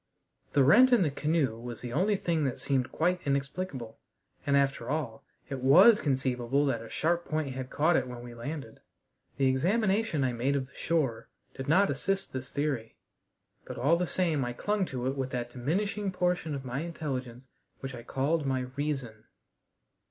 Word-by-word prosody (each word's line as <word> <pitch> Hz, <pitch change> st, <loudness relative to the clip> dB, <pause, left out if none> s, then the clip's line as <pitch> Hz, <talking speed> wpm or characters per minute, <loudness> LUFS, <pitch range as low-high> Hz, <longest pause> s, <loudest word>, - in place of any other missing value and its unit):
The 140 Hz, -, +5 dB
rent 240 Hz, -, +7 dB
in 235 Hz, -6 st, +5 dB
the 150 Hz, -, 0 dB
canoe 145 Hz, -6 st, 0 dB
was 120 Hz, -1 st, -7 dB
the 120 Hz, -1 st, -6 dB
only 205 Hz, +7 st, +2 dB
thing 170 Hz, -5 st, 0 dB
that 130 Hz, -, -2 dB
seemed 130 Hz, -3 st, 0 dB
quite 180 Hz, +2 st, +1 dB
inexplicable; 140 Hz, -3 st, -3 dB, 0.5 s
and, 140 Hz, 0 st, +4 dB
after 135 Hz, -4 st, 0 dB
all, 140 Hz, -7 st, -3 dB, 0.2 s
it 135 Hz, -2 st, -4 dB
was 185 Hz, -, +7 dB
conceivable 130 Hz, -1 st, 0 dB
that 125 Hz, -5 st, 0 dB
a 115 Hz, -, -10 dB
sharp 170 Hz, +2 st, 0 dB
point 155 Hz, -3 st, -2 dB
had 130 Hz, 0 st, -5 dB
caught 160 Hz, +3 st, +2 dB
it 130 Hz, -3 st, +1 dB
when 120 Hz, -1 st, -8 dB
we 120 Hz, -1 st, -9 dB
landed. 120 Hz, 0 st, -7 dB, 0.6 s
The 135 Hz, -, +2 dB
examination 190 Hz, -, +2 dB
I 125 Hz, -1 st, +1 dB
made 130 Hz, +4 st, 0 dB
of 135 Hz, -2 st, -1 dB
the 135 Hz, -, -22 dB
shore 145 Hz, -9 st, -1 dB, 0.2 s
did 135 Hz, 0 st, -7 dB
not 190 Hz, +7 st, +4 dB
assist 195 Hz, +8 st, -2 dB
this 130 Hz, 0 st, -5 dB
theory, 140 Hz, -6 st, -2 dB, 0.7 s
but -, -, -8 dB
all 150 Hz, +6 st, +3 dB
the 175 Hz, +1 st, -1 dB
same 160 Hz, -7 st, +1 dB
I 120 Hz, 0 st, -3 dB
clung 205 Hz, +6 st, -1 dB
to 125 Hz, -2 st, -4 dB
it 135 Hz, +1 st, 0 dB
with 135 Hz, -1 st, -2 dB
that 120 Hz, -1 st, -3 dB
diminishing 195 Hz, -, -1 dB
portion 180 Hz, -4 st, 0 dB
of 135 Hz, -1 st, -6 dB
my 125 Hz, +1 st, -3 dB
intelligence 130 Hz, -6 st, -5 dB, 0.3 s
which 135 Hz, 0 st, -5 dB
I 120 Hz, -, -7 dB
called 145 Hz, +6 st, 0 dB
my 130 Hz, -2 st, 0 dB
"reason." 135 Hz, -7 st, -3 dB
140 Hz, 180 wpm, -29 LUFS, 130-170 Hz, 0.7 s, rent